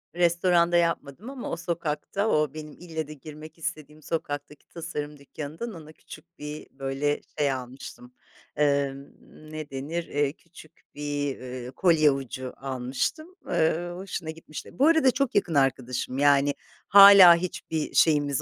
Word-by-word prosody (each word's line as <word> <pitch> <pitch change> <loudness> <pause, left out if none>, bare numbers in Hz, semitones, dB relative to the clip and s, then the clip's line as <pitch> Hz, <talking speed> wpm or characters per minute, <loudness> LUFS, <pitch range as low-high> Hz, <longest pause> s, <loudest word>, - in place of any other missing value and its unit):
Restoranda 175 0 +3
yapmadım 170 - -1
ama 270 -2 -6
o - - -2
sokakta, 170 +4 -2
o 150 -5 +1
benim 155 -1 -8
ille 160 -3 -6
de 155 - -8
girmek 155 +2 -12
istediğim 155 -1 -6
sokaktaki 145 -2 -5
tasarım 150 -3 -6
dükkânından 155 - -7
ona 155 -2 -11
küçük 170 +2 -15
bir 150 +1 -7
böyle 135 +2 -2 0.2
şey 145 -2 +2
almıştım, 125 -1 -8 0.4
emm, 140 -2 +1 0.5
ne 155 -1 -6
denir, 150 +6 -4
eee, 145 0 0
küçük 165 -2 -17 0.2
bir, 145 -1 -3
eee, 125 0 -7
kolye 155 -4 +4
ucu 130 -1 -5
almıştım. 135 - -3
Eee, 165 +2 +1
hoşuna 180 -3 -6
gitmişti. 160 +4 -9
Bu 285 - +5
arada 320 -6 +5
çok 275 -1 -1
yakın 195 -4 +1
arkadaşım, 130 -1 0
yani, 145 0 +4 0.3
hâlâ 200 -3 +10
hiçbir 170 -3 -4
şeyimiz 145 -4 +3
150 Hz, 135 wpm, -26 LUFS, 140-170 Hz, 0.5 s, hâlâ